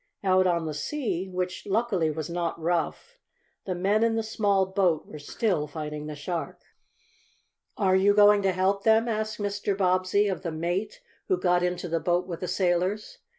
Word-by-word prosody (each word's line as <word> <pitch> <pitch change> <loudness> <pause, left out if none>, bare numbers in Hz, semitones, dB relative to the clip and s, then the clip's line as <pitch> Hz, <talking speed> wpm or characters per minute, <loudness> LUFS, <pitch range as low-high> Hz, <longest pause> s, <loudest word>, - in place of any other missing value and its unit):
Out 185 -1 +4
on 170 -2 +1
the 155 - -3
sea, 195 - -3
which, 180 +1 -4
luckily, 200 -5 +1
was 155 0 -4
not 170 -1 -3
rough, 175 - -2 0.5
the 185 - -2
men 200 +5 +2
in 230 -1 +2
the 225 - 0
small 205 -3 +1
boat 185 -4 +1
were 150 - -10
still 150 +1 -1
fighting 150 0 -6
the 150 - -6
shark. 165 +3 -5 1.1
"Are 190 -3 +3
you 200 +2 +4
going 205 0 +6
to 195 -1 +2
help 190 +2 +1
them?" 220 +1 +4
asked 215 -1 -2
Mr. 205 -1 -2
Bobbsey 185 +2 +2
of 190 - -2
the 170 - -4
mate 175 - -3 0.3
who 375 - +2
got 180 -1 +2
into 180 0 -2
the 165 0 -1
boat 175 +2 0
with 175 -3 -6
the 180 - -4
sailors. 185 +4 -1
185 Hz, 180 wpm, -26 LUFS, 170-205 Hz, 1.1 s, going